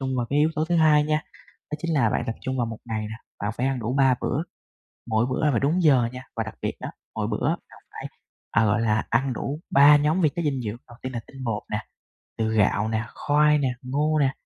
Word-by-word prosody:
trung 130 -1 -2
vào 120 -1 -1
cái 145 - +2
yếu 155 +2 +4
tố 155 - 0
thứ 170 +1 0
hai 150 -2 +5
nha. 155 0 0 0.5
Đó - - -1
chính 165 -1 -1
là 120 -7 +3
bạn - - 0
tập 115 - -3
trung 130 -1 -3
vào 120 - +1
1 115 -1 -6
ngày 110 -2 -3
nè, 110 0 -5 0.3
bạn 100 +1 -2
phải 130 +2 +1
ăn 135 -2 -1
đủ 115 +3 -2
3 135 -2 +5
bữa, 145 - 0 0.7
mỗi 110 +1 +2
bữa 130 - -1
ăn 150 - +4
phải 115 - +2
đúng 160 +6 +1
giờ 135 -7 +5
nha, 125 0 -8
và 115 - -1
đặc 110 - -8
biệt - - -2
đó - - -5 0.3
mỗi - - -1
bữa - - -1
bạn - - -5
phải, - - -7 0.4
à, 110 - +3
gọi 105 +2 +2
là, 110 -1 +1
ăn 130 +3 +1
đủ 140 +6 -4
3 145 +1 +7
nhóm 150 +5 +1
vi 155 - +4
chất 170 - -4
dinh 140 -5 -1
dưỡng. 110 0 -4
Đầu 120 - -14
tiên 130 - -4
là 120 - -2
tinh 135 -1 -10
bột 110 -4 -2
nè, 105 +1 -1 0.6
từ 110 -1 0
gạo 105 0 +2
nè, 110 0 -1
khoai 150 +1 +3
nè, 140 -3 +1
ngô 150 +4 0
nè. 135 -2 +3
130 Hz, 260 wpm, -25 LUFS, 115-150 Hz, 0.7 s, 3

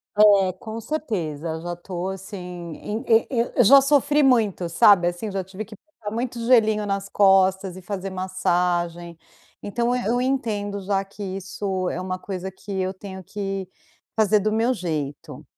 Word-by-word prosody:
É, 200 -3 +5
com 220 +3 -7
certeza 170 - -3
já 175 +1 -4
tô, 180 +1 -5
assim, 190 +2 -7
em 180 - -6
e 225 0 +4
e - - -2
e 235 - -3
eu 245 - +5
já 275 +6 +8
sofri 290 +1 +3
muito 220 -10 +2
sabe 175 +1 +5
assim, 175 +4 -3
já 190 -1 -2
tive 190 +3 -7
que 215 - -12
colocar 220 -4 -10
muito 240 +1 -3
gelinho 220 -4 +4
nas 195 0 -2
costas, 190 -1 +3
e 185 - -9
fazer 195 +1 -5
massagem, 175 -2 -1 0.5
então, 235 +4 0
eu 250 - -2
eu 245 - +1
entendo 215 -6 -1
já 195 0 0
que 200 +1 -10
isso 190 -1 -3
é - - -3
uma 185 0 -4
coisa 190 0 -5
que 195 +2 -11
eu 185 0 -1
tenho 190 -1 -9
que 195 0 -4 0.5
fazer 215 -1 +4
do 215 +2 0
meu 225 +3 +2
jeito. 155 - -5
195 Hz, 175 wpm, -23 LUFS, 185-220 Hz, 0.5 s, já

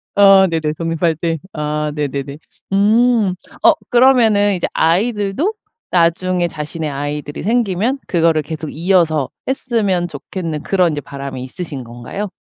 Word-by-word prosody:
아 195 -1 +7
네네 160 -2 -1
독립할 165 0 0
때. 165 0 -2
아 150 0 -2
네네네. 140 -1 -3 0.4
음. 215 0 +3 0.3
어 - - +8 0.2
그러면은 230 -5 +4
이제 175 - -1
아이들도 205 - +1 0.4
나중에 175 +1 +2
자신의 155 0 -5
아이들이 145 +1 -4
생기면 230 +3 0
그거를 165 -3 +2
계속 155 +1 -6
이어서 165 -4 +1 0.2
했으면 215 -9 0
좋겠는 160 0 -5
그런 180 -3 +2
이제 145 -1 -3
바람이 140 -2 -7
있으신 140 0 -6
건가요? 120 - -6
170 Hz, 305 characters per minute, -17 LUFS, 150-200 Hz, 0.4 s, 어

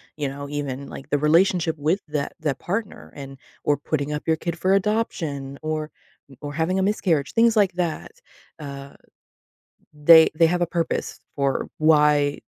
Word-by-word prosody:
you 150 -2 -2
know, 140 +1 -7
even, 140 -2 -4
like, 135 - -10
the 145 - +2
relationship 165 +3 +2
with 160 +7 0
that 150 -2 -3
that 150 -3 -2
partner 180 - -5
and 135 -1 -9 0.3
or 145 -1 +2
putting 145 0 -3
up 150 - -5
your 160 - +3
kid 170 +1 -5
for 185 +2 +2
adoption 165 -10 -2
or 155 -1 -3 0.5
or 145 -1 -6
having 165 +5 0
a 190 - +1
miscarriage, 175 -8 0
things 230 0 +4
like 195 -3 +3
that. 175 - -3 0.5
Uh, 140 -1 -8 1.0
they 160 +2 +7
they 165 - +5
have 175 +2 +1
a 175 - +2
purpose 170 -1 -3 0.2
for 140 -2 -1
why 150 -2 +3
155 Hz, 165 wpm, -23 LUFS, 145-175 Hz, 1.0 s, they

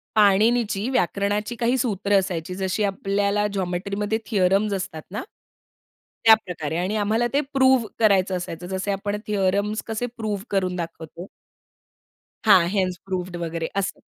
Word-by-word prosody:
पाणीनिची 215 +2 +3
व्याकरणाची 205 0 0
काही 240 +2 +1
सूत्र 205 -4 +1
असायची, 180 -2 -4
जशी 190 +2 -1
आपल्याला 200 +1 0
जॉमेट्री 185 +1 -2
मध्ये 210 +2 0
थियोरम्स 200 0 +2
असतात 180 -5 -4
ना 210 - -4 1.0
त्याप्रकारे 180 -8 +3
आणि 185 +5 -1
आम्हाला 220 +3 +1
ते 285 - +3
प्रूव्ह 260 -4 +4
करायचं 195 -4 +3
असायचं. 175 0 -6
जसे 190 +2 -2
आपण 205 +1 -2
थियोरम्स 205 +1 0
कसे 225 +2 -2
प्रूव्ह 210 -3 -3
करून 185 -2 0
दाखवतो. 170 +1 -7 1.2
हां 185 -5 +6
हेन्स 185 -3 0
प्रूव्ड 185 -2 -4
वगैरे 165 -1 -3
असं. 200 -1 -2
200 Hz, 130 wpm, -23 LUFS, 185-215 Hz, 1.2 s, हां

